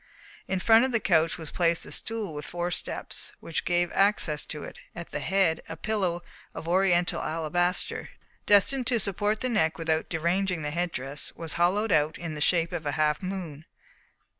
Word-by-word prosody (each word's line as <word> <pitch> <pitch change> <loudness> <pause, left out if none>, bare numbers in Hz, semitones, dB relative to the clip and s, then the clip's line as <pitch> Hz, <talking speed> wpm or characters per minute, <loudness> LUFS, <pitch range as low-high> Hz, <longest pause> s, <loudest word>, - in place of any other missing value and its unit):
In 190 - -1
front 225 +4 +6
of 260 - +1
the 230 - +2
couch 165 -5 +2
was 160 -3 -7
placed 170 -1 +1
a - - -10
stool 220 -7 0
with 150 0 -6
four 175 +2 -3
steps, - - -5
which 165 - -3
gave 175 0 +1
access 195 -6 +1
to 150 -2 -5
it: - - -9 0.2
at 170 0 -8
the - - -3
head, 190 -4 +1
a 160 - -6
pillow 185 -3 -1 0.3
of 160 - -7
Oriental 175 -1 +2
alabaster, 170 +3 -1 0.4
destined 230 +5 +4
to 240 -2 +2
support 205 +2 -1
the 255 - 0
neck 160 -9 +1
without 160 -1 -1
deranging 175 +1 0
the 150 - -2
head 175 +2 -1
dress, 135 +2 -2
was 165 -2 -5
hollowed 190 +5 +2
out 155 -1 +2
in 170 -2 -5
the 150 - -6
shape 165 +1 +3
of 165 -4 -4
a 145 - -1
half 150 -1 +1
moon. 180 -6 -5
175 Hz, 190 wpm, -27 LUFS, 160-195 Hz, 0.4 s, front